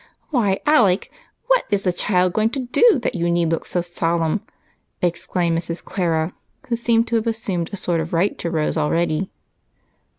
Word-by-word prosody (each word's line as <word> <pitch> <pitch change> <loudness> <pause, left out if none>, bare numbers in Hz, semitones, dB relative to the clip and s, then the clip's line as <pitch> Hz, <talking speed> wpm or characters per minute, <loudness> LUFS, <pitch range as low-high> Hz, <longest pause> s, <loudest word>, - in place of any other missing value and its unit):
"Why, 210 -8 +1
Alec, 220 -11 +3 0.3
what - - +3
is 200 -2 0
the 180 - +1
child 180 -1 +1
going 215 +2 +2
to - - -1
do 345 - +4
that - - 0
you 170 -3 -1
need 170 -1 +1
look 165 - -2
so 175 - 0
solemn?" 170 +1 -1 0.6
exclaimed 170 0 0
Mrs. 165 0 -3
Clara, 165 -3 -1 0.4
who 235 - +2
seemed 230 0 +2
to 230 - +2
have 225 +1 -2
assumed 195 -7 -2
a 200 - -5
sort 170 -3 0
of 160 - -5
right 175 +4 +1
to 170 - -2
Rose 160 -1 -1
already. 165 +3 0
180 Hz, 175 wpm, -21 LUFS, 170-220 Hz, 0.6 s, do